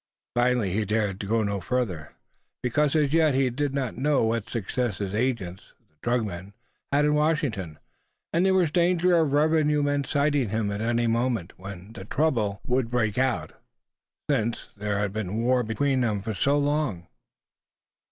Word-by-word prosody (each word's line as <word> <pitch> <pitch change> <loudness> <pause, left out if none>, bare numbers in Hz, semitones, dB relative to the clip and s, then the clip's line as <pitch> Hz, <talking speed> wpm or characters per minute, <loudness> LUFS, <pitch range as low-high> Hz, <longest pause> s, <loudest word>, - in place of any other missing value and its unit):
Finally 120 -5 +2
he 110 +2 +1
dared 105 -2 -1
go 115 +1 +2
no 100 -2 -2
further, 95 -9 -2 0.5
because 145 +4 +1
as 150 -2 +2
yet 160 -4 +4
he 130 -1 +2
did 145 +3 -1
not 135 -4 -3
know 145 -1 +2
what 110 -1 -1
success 115 0 -2
his 100 -2 -4
agents, 105 -6 -2 0.2
the 75 - -38
drug 120 -1 +1
men, 95 0 -7 0.4
had 145 +1 +3
in 150 - +3
Washington; 145 - 0 0.6
and 170 +2 +3
there 190 0 +4
was 175 -5 +3
danger 175 +1 +3
of 160 -4 +3
revenue 150 0 +3
men 145 0 +1
sighting 140 -3 +1
him 110 -1 -1
at 100 +1 -3
any 120 +1 +1
moment, 115 -5 0
when 95 +2 -9 0.2
trouble 115 -10 0
must 125 -1 +1
break 115 -3 0
out, 120 -13 0 0.7
since 120 -5 -1
there 105 0 -2
had 100 -1 -1
been 105 -1 -3
war 125 +1 +3
between 130 +4 0
them 110 -4 0
for 110 +3 -4
so 140 +8 +2
long. 145 - 0
120 Hz, 165 wpm, -26 LUFS, 105-145 Hz, 0.7 s, yet